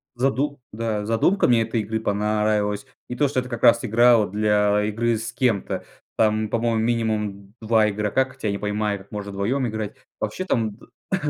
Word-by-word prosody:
заду 135 +3 0
да, 110 -2 -2
задумка 115 - +2
мне 120 -2 +4
этой 115 0 -1
игры 110 +2 -3
понравилась. 105 -1 0 0.2
И 125 - -4
то, 145 - +2
что 130 -1 0
это 125 - -5
как 120 -2 -5
раз 115 +1 +6
игра 120 +2 +5
вот 105 -4 0
для 105 0 +2
игры 115 +2 0
с 115 +2 -5
кем-то. 115 -5 -1 0.3
Там, 110 -1 +2
по-моему, 115 0 0
минимум 105 -4 -1
2 110 -1 +3
игрока, 105 +5 0
хотя 130 -5 -4
не 100 - -2
понимаю, 105 0 -1
как 95 +2 -17
можно 105 -1 -5
вдвоем 120 +7 -1
играть. 110 -2 -4 0.2
Вообще, 185 - -3
там, 110 - -1 0.4
э, - - +5
110 Hz, 180 wpm, -23 LUFS, 105-120 Hz, 0.4 s, раз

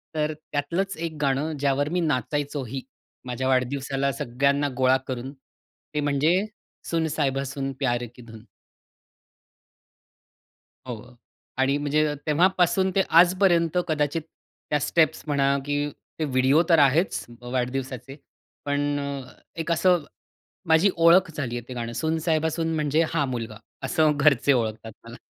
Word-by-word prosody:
तर 155 0 0
त्यातलंच 160 +6 -3
एक 165 0 -4
गाणं 140 +3 0
ज्यावर 145 +1 +1
मी 180 +2 0
नाचायचोही 140 -3 -2 0.4
माझ्या 125 +1 -3
वाढदिवसाला 135 +1 0
सगळ्यांना 140 +4 0
गोळा 130 0 +4
करून 130 +1 -4 0.6
ते 150 - -1
म्हणजे 150 +7 +2 0.4
सुन 165 -1 0
साहिबा 140 -3 -1
सुन 135 0 -4
प्यार 120 -3 0
की 125 - -13
धुन. 115 -2 -12 2.5
हो. 125 +1 -8 0.4
आणि 135 +2 +2
म्हणजे 150 +1 +1
तेव्हापासून 180 +3 +3
ते 195 - +5 0.2
आजपर्यंत 180 -2 +3
कदाचित 150 +1 0 0.5
त्या 150 - +2
स्टेप्स 160 +2 +2
म्हणा 140 -1 +2
की 145 0 0 0.3
ते 155 - 0
व्हिडिओ 135 +3 +3
तर 165 - +5
आहेच 150 +6 +3 0.2
अ, 120 - -10
वाढदिवसाचे, 130 +1 -3 0.5
पण 145 0 0
अ, 140 -2 -5 0.3
एक 165 +1 -1
असं 175 -1 +3 0.6
माझी 160 +5 +5
ओळख 170 +2 +5
झाली 125 -5 -3
आहे, 120 +1 -7
ते 125 - -6
गाणं 120 -1 -4
सून 160 +6 -1
साहेबा 160 0 +1
सून 165 0 -2
म्हणजे 155 +1 +1
हा 150 -3 +2
मुलगा 115 -4 -4 0.3
असं 155 -3 +2
घरचे 140 -1 +4
ओळखतात 110 -2 -2
मला. 115 +1 -10
145 Hz, 135 wpm, -25 LUFS, 130-160 Hz, 2.5 s, ते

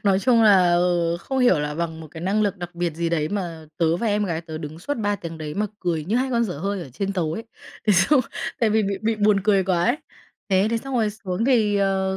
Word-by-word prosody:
Nói 195 -2 +4
chung 235 +1 +4
là, 190 -5 +6
ờ, 175 -1 +1
không 265 +8 -3
hiểu 245 - +4
là 150 0 -3
bằng 165 -1 -3
một 160 - -10
cái 160 - -9
năng 195 +5 +1
lực 205 -1 0
đặc 175 -1 -7
biệt 170 -2 -2
gì 170 +1 -1
đấy, 155 -2 0
mà 170 -5 -4
tớ 165 0 +2
và 230 - -2
em 210 -1 +1
gái 165 -4 -2
tớ 160 -2 -7
đứng 155 +1 -7
suốt 285 +12 -3
3 205 -2 0
tiếng 165 -3 -8
đấy 150 -1 -5
mà 210 +1 0
cười 165 -4 -1
như 205 +8 0
hai 260 +1 0
con 235 -1 +2
dở 180 -9 -5
hơi 200 +3 -2
ở 135 - -10
trên 195 +10 -3
tàu 165 -5 -1
ấy, 225 +7 -5 0.4
thế 210 - +5
xong 200 +10 +4 0.4
tại 225 -2 +3
vì 220 +1 +3
bị 195 -1 -2
bị 225 0 +1
buồn 205 -1 +3
cười 200 -3 +3
quá 175 -2 +1
ấy. - - +2 0.5
Thế 190 0 +3
thế 230 - +1
xong 270 +3 -6
rồi 220 -4 +2
xuống 200 -1 -3
thì, 225 -6 +3
ờ, 190 -1 +1
190 Hz, 270 wpm, -23 LUFS, 170-210 Hz, 0.5 s, là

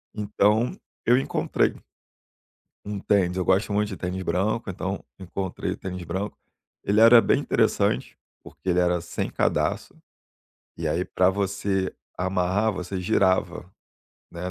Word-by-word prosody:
Então, 105 - +2 0.3
eu 120 +2 +5
encontrei 135 - 0 1.1
um 105 0 -4
tênis. 95 -3 +1
Eu 90 - 0
gosto 100 +3 +2
muito 105 0 +1
de 95 - -6
tênis 90 +1 -4
branco, 105 +3 -1
então 95 +2 -4
encontrei 95 0 -4
o - - -4
tênis 90 -1 -6
branco. 95 +5 -4 0.5
Ele 105 +2 +3
era 115 +1 +9
bem - - +2
interessante, - - +1 0.2
porque - - -11
ele 90 - +2
era 90 0 +2
sem 85 - -4
cadarço, - - 0 0.8
e 85 - -3
aí, 85 +4 0
pra 90 +1 +2
você 95 0 -1 0.2
amarrar, 95 +4 +1
você 90 0 -4
girava, 95 -2 +1 0.6
né. 90 +1 -5
95 Hz, 135 wpm, -25 LUFS, 90-105 Hz, 1.1 s, era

